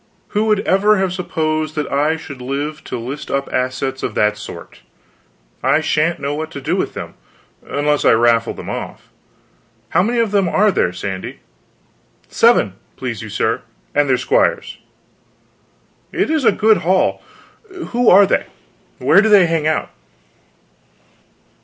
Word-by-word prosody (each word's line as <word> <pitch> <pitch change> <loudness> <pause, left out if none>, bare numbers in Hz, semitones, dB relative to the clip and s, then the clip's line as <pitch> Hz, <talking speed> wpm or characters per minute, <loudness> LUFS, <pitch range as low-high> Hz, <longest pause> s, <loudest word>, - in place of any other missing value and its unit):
"Who 210 0 0
would 215 -2 +2
ever 205 +3 +3
have 190 -1 0
supposed 155 -4 -2
that 150 -2 -3
I 150 +3 +1
should 140 -4 -10
live 145 +4 -4
to - - -4
list 130 +5 -6
up 140 0 -1
assets 130 +1 -2
of - - -4
that 105 0 +2
sort. - - -10 0.8
I - - +3
shan't 160 +1 0
know 140 +1 -2
what 155 +1 -4
to - - -6
do 135 - -1
with - - -2
them; - - -7 0.5
unless 145 0 0
I - - +5
raffle 115 0 +2
them - - -9
off. - - -7 0.8
How - - +3
many 235 +6 0
of 230 -3 +1
them 195 -4 +2
are 210 +4 +3
there, 90 - +1
Sandy?" 95 +1 -6 0.9
"Seven, 225 - +3 0.2
please 120 -5 -5
you, 110 - -8
sir, 110 +3 -1 0.3
and 145 -1 +2
their 130 - +3
squires." 125 - 0 1.3
"It - - 0
is 310 -5 0
a - - +6
good 220 0 +3
haul. 185 +3 +1 0.7
Who 245 0 +3
are 200 +2 +7
they? - - 0 0.5
Where 195 - +4
do 220 - +1
they 200 -4 +6
hang 165 -2 0
out?" 155 - -1
155 Hz, 155 wpm, -18 LUFS, 130-195 Hz, 1.3 s, are